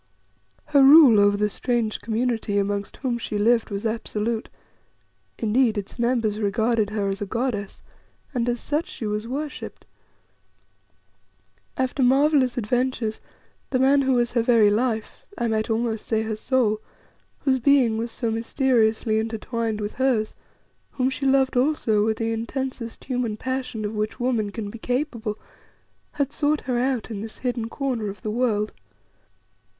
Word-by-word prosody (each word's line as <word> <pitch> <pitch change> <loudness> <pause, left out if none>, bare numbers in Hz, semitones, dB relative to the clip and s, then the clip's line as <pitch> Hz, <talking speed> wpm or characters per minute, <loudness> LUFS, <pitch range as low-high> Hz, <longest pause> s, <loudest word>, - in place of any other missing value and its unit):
Her 290 -2 +4
rule 270 -5 +8
over 205 0 +4
the 210 +1 +2
strange 230 0 -1
community 225 -2 -1
amongst 200 0 -2
whom 240 -3 -2
she 215 - -3
lived 230 +2 +3
was 200 +1 -4
absolute; 225 0 -2 0.9
indeed, 225 0 +2
its 205 +4 -6
members 235 -3 +1
regarded 220 +1 +1
her 205 -1 -1
as 195 +1 -3
a 205 - -2
goddess, 215 -3 -3 0.5
and 245 -2 0
as 240 0 -1
such 300 +7 -1
she 365 -11 -6
was 210 +1 -2
worshipped. 290 +4 -6 1.9
After 260 +1 -1
marvellous 265 0 +3
adventures, 245 -1 -1 0.5
the 260 - +1
man 270 +2 +4
who 265 -1 +2
was 240 -1 +2
her 240 - +2
very 225 -3 +4
life, 220 0 -1
I 235 - 0
might 220 0 -1
almost 225 -1 -1
say 220 -1 +1
her 220 -1 -3
soul, 220 -2 +1 0.6
whose 265 -2 +2
being 245 -4 +3
was 230 +1 -2
so 230 0 -2
mysteriously 225 -2 +1
intertwined 225 0 -3
with 205 0 -4
hers, 250 -5 +1 0.6
whom 260 0 0
she 275 +1 -2
loved 265 -1 +3
also 245 -6 +2
with 220 0 0
the 225 0 -1
intensest 235 +1 -4
human 245 -5 -2
passion 255 -3 -3
of 210 - -3
which 215 0 -3
woman 240 -4 0
can 205 -1 -5
be 230 - -9
capable, 245 -4 -2 0.8
had 280 -1 -1
sought 300 0 0
her 250 -2 -1
out 250 -2 -1
in 205 -2 -4
this 220 0 -8
hidden 240 -2 -1
corner 245 -6 -2
of 195 -1 -10
the 215 - -2
world. 215 -3 0
230 Hz, 155 wpm, -24 LUFS, 215-255 Hz, 1.9 s, rule